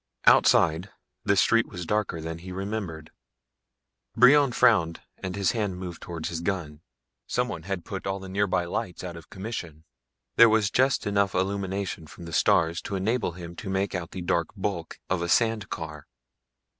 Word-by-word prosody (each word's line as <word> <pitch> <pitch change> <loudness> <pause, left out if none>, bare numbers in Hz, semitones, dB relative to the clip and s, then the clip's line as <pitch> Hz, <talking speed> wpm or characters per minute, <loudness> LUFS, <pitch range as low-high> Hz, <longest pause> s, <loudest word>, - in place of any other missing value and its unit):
Outside, 80 +5 +5 0.3
the - - +3
street 115 0 +4
was 90 -3 -7
darker 105 -4 -1
than 80 +1 -5
he 90 +2 -9
remembered. 95 -5 -5 1.0
Brion 140 +1 +6
frowned 105 -10 +3 0.2
and 95 -1 -4
his 100 -2 +2
hand 105 -5 -2
moved 90 -2 -7
towards 85 -3 -5
his 85 -1 -4
gun. 85 -5 -3 0.5
Someone 85 - -1
had 95 0 -4
put 95 -1 -5
all 95 0 -1
the 95 - -9
nearby 95 -2 0
lights 90 +1 -4
out 90 -2 -6
of 85 - -12
commission. 95 -7 -6 0.5
There 115 -1 +9
was 110 -2 +2
just 130 +4 +2
enough 100 -1 +1
illumination 95 -2 -2
from 85 +1 -11
the 85 - -8
stars 85 -5 +3
to 100 - -4
enable 100 0 0
him 85 0 -9
to 100 - -6
make 95 +1 -1
out 90 -3 -3
the 95 - -6
dark 85 -1 +1
bulk 95 -4 -3
of 95 -2 0
a 85 - -2
sand 110 -1 +2
car. 75 -2 -6
95 Hz, 170 wpm, -26 LUFS, 85-100 Hz, 1.0 s, There